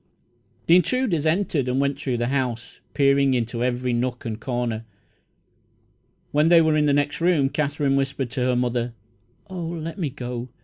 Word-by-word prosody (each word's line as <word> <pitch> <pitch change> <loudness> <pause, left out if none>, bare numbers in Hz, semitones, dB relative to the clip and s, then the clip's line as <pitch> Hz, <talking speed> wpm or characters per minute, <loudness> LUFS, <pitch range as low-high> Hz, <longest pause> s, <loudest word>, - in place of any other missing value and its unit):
The 170 - +6
intruders 180 - +1
entered 155 -5 0
and 130 +1 0
went 140 0 0
through 130 -4 -1
the 120 +1 -1
house, 125 -4 -3 0.2
peering 140 -1 +3
into 120 0 -2
every 125 0 -1
nook 125 +1 -2
and 110 -1 -4
corner. 120 -3 -2 1.5
When 150 +2 +3
they 170 -1 +7
were 160 -1 +3
in 150 -1 +2
the - - +3
next 145 +2 0
room, 165 -6 +3
Katherine 145 -1 0
whispered 135 -2 -1
to 130 -1 -3
her 125 -1 +2
mother: 120 -1 -1 0.5
"Oh, 185 -2 -6
let 165 +1 -5
me 160 -5 -1
go! 125 -1 -6
135 Hz, 170 wpm, -23 LUFS, 125-155 Hz, 1.5 s, they